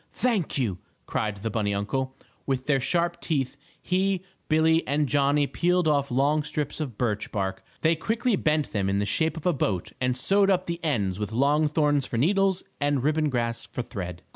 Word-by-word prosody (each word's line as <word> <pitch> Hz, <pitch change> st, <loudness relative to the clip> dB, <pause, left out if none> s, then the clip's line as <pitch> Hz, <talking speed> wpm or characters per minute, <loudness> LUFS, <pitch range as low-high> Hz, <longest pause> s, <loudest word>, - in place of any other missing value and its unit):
Thank 220 Hz, -13 st, 0 dB
you!" 105 Hz, -9 st, -1 dB, 0.3 s
cried 105 Hz, -2 st, -2 dB
the 115 Hz, -, -1 dB
bunny 105 Hz, -3 st, 0 dB
uncle. 130 Hz, +6 st, -2 dB, 0.3 s
With 130 Hz, -1 st, -1 dB
their 140 Hz, -2 st, +2 dB
sharp 170 Hz, +5 st, 0 dB
teeth 140 Hz, -5 st, -1 dB, 0.2 s
he, 190 Hz, 0 st, 0 dB, 0.3 s
Billie 160 Hz, +1 st, +4 dB
and 145 Hz, +1 st, +2 dB
Johnnie 145 Hz, +1 st, +3 dB
peeled 175 Hz, +3 st, +1 dB
off 140 Hz, -2 st, +2 dB
long 140 Hz, +5 st, +2 dB
strips 150 Hz, 0 st, -3 dB
of 135 Hz, -9 st, -4 dB
birch 110 Hz, -4 st, -1 dB
bark. 95 Hz, -2 st, -2 dB, 0.2 s
They 165 Hz, +1 st, +3 dB
quickly 225 Hz, +7 st, 0 dB
bent 155 Hz, -4 st, 0 dB
them 100 Hz, -3 st, 0 dB
in 100 Hz, -, +1 dB
the 100 Hz, -, +1 dB
shape 160 Hz, -, 0 dB
of 160 Hz, -, -8 dB
a 180 Hz, -, +3 dB
boat 95 Hz, -, -1 dB
and 125 Hz, 0 st, +1 dB
sewed 195 Hz, +8 st, +3 dB
up 185 Hz, -1 st, +2 dB
the 170 Hz, 0 st, -4 dB
ends 105 Hz, -, 0 dB
with 105 Hz, 0 st, -3 dB
long 145 Hz, +6 st, +3 dB
thorns 145 Hz, -2 st, +1 dB
for 115 Hz, -, -3 dB
needles 190 Hz, -, +2 dB, 0.2 s
and 145 Hz, -3 st, +1 dB
ribbon 155 Hz, +1 st, +2 dB
grass 115 Hz, -3 st, -2 dB
for 125 Hz, -, -4 dB
thread. 90 Hz, -7 st, -6 dB
145 Hz, 190 wpm, -26 LUFS, 115-160 Hz, 0.3 s, Billie